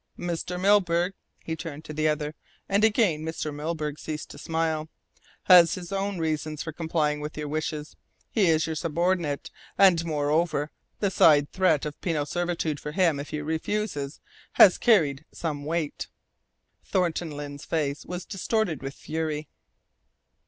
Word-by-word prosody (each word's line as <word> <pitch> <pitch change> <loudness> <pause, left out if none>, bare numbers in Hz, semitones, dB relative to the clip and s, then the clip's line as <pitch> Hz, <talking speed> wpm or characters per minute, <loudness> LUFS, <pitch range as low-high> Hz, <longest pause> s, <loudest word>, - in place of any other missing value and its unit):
"Mr. 175 +1 -3
Milburgh," 185 -2 +3 0.3
he 160 - -3
turned 160 -1 -7
to 155 - -7
the 155 +1 +1
other, 150 0 -1 0.3
and 200 +2 +2
again 210 -8 +3
Mr. 160 -1 -3
Milburgh 150 0 -3
ceased 155 -1 -6
to - - -11
smile, 160 -1 -1 0.5
"has 175 -2 +7
his 180 -1 -8
own 195 0 -1
reasons 155 -2 -2
for 160 - -5
complying 155 -2 0
with 150 +1 -6
your 150 -1 -3
wishes. 155 0 -3 0.4
He 205 -5 +3
is 160 -1 +3
your 160 - -3
subordinate, 170 -2 -1 0.3
and 185 -4 +6
moreover, 150 0 0 0.3
the 200 -2 +2
side 145 -5 +5
threat 180 -7 +2
of 150 -1 -6
penal 155 -5 0
servitude 170 -2 -2
for 150 - -6
him 165 -5 +2
if 145 - -6
he 150 - -3
refuses 160 -1 -2 0.3
has 185 - +7
carried 155 - +3
some 145 -4 -4
weight." 160 -1 -2 0.8
Thornton 175 -2 0
Lyne's 145 -1 -7
face 150 -3 -1
was 180 0 -6
distorted 195 - -1
with 135 0 -6
fury. 155 -1 -3
160 Hz, 150 wpm, -26 LUFS, 150-175 Hz, 0.8 s, has